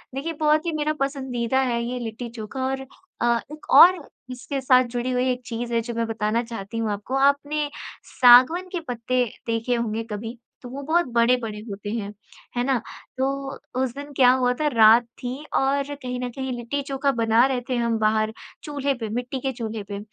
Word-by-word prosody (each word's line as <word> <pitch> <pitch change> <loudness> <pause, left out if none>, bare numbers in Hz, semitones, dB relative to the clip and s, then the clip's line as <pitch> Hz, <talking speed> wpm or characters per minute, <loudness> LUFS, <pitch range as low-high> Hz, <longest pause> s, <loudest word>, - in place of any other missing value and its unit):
देखिए 325 +5 -3
बहुत 305 +1 +2
ही 335 - 0
मेरा 305 0 0
पसंदीदा 265 -3 -1
है 240 -2 0
ये 250 +1 -3
लिट्टी-चोखा 235 +2 -5
और 265 0 -2 0.4
अ, 235 -1 +3
एक 305 - -11
और 365 +2 +9 0.3
इसके 255 +3 -4
साथ 255 -1 +5
जुड़ी 245 +1 -1
हुई 250 +1 +1
एक 250 0 -3
चीज़ 235 0 -4
है 230 - +2
जो 235 +1 -6
मैं 230 0 -1
बताना 225 +1 -1
चाहती 230 -1 -7
हूँ 225 -2 -1
आपको। 205 +6 -4
आपने 285 +2 +2 0.3
सागवन 260 +9 +6
के 355 - -2
पत्ते 245 +1 0 0.2
देखे 230 +2 0
होंगे 225 -1 -2
कभी 225 +3 -5 0.2
तो 245 - -9
वो 275 +2 -6
बहुत 335 +3 +2
बड़े-बड़े 235 -2 +2
होते 205 +1 -6
हैं, 210 -3 -4 0.4
है 245 - +2
ना? 265 -1 +2 0.4
तो 275 +1 -2 0.3
उस 245 -2 -2
दिन 285 +1 -8
क्या 250 -2 +7
हुआ 250 -1 +2
था 300 - +2
रात 225 +1 +7 0.2
थी 245 +1 -3 0.2
और, 280 +1 +1
कहीं 250 -2 -5
न 250 0 -3
कहीं 265 -1 -3
लिट्टी-चोखा 275 +3 -1
बना 230 0 +3
रहे 255 -2 -1
थे 250 - 0
हम 235 -1 0
बाहर 215 0 +1 0.3
चूल्हे 285 -2 -1
पे, 225 -4 -5
मिट्टी 245 +4 -3
के 265 +1 -2
चूल्हे 225 -3 -5
पे, 200 - -4
250 Hz, 190 wpm, -24 LUFS, 230-275 Hz, 0.4 s, और